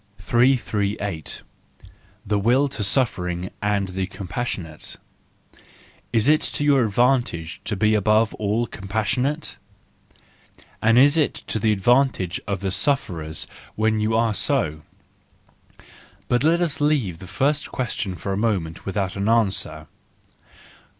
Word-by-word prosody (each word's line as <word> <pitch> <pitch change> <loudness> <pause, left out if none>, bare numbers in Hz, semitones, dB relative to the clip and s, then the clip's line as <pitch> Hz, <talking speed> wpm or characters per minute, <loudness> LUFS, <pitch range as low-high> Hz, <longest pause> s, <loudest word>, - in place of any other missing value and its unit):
338. 100 -5 0 0.8
The 105 0 +1
Will 125 +7 +3
to 110 -5 -4
Suffering 90 -6 0
and 100 -2 0
the 95 0 -2
Compassionate 95 -4 -5 1.2
.—Is 115 +1 +2
it 155 +1 +5
to - - -2
your 140 -3 +4
advantage 110 -7 +1
to 105 - -1
be 110 +2 +2
above 110 +2 +3
all 110 +3 0
compassionate? 110 +9 -2 1.2
And 115 +2 +4
is 145 +5 +6
it 155 - +2
to 110 - -2
the 110 +1 +2
advantage 105 -4 +2
of 100 -2 -2
the 95 -1 -1
sufferers 90 - -1 0.3
when 110 0 +1
you 110 +1 +1
are 115 -1 +2
so? 80 -5 0 1.5
But 120 +2 +1
let 170 +3 +3
us 155 -3 -2
leave 130 - +1
the 95 - -10
first 140 +10 0
question 110 -6 -3
for 95 +2 -4
a - - -1
moment 95 -7 -1
without 95 -1 -2
an 100 +2 -1
answer. 95 -9 +1
105 Hz, 125 wpm, -23 LUFS, 95-125 Hz, 1.5 s, is